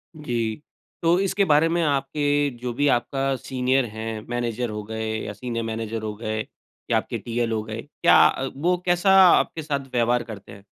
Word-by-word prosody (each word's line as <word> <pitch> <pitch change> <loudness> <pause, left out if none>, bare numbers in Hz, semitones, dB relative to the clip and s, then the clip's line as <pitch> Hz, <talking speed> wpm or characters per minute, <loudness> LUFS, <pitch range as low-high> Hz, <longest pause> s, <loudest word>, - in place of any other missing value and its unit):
जी। 120 -5 -3 0.4
तो 170 +2 +4
इसके 195 +1 +1
बारे 155 -1 +4
में 170 +1 +1
आपके 145 0 +1
जो 125 0 -4
भी 145 +4 +1
आपका 135 +1 +1
सीनियर 130 0 0
है, 110 0 -5
मैनेजर 120 0 -2
हो 105 0 -5
गए 110 +1 -4 0.2
या 105 - -5
सीनियर 115 +2 -4
मैनेजर 115 0 -4
हो 110 -1 -4
गए, 110 0 -3 0.5
या - - +4
आपके - - -3
टीएल 120 0 -2
हो 110 -1 0
गए। 110 +1 -6
क्या 145 - +2
अ, 135 - -2
वो 175 +6 +1
कैसा 175 +2 +3 0.2
आपके 165 -1 +3
साथ 145 -2 -1
व्यवहार 120 0 +2
करते 110 -4 -10
हैं? 100 0 -13
120 Hz, 185 wpm, -24 LUFS, 110-145 Hz, 0.5 s, तो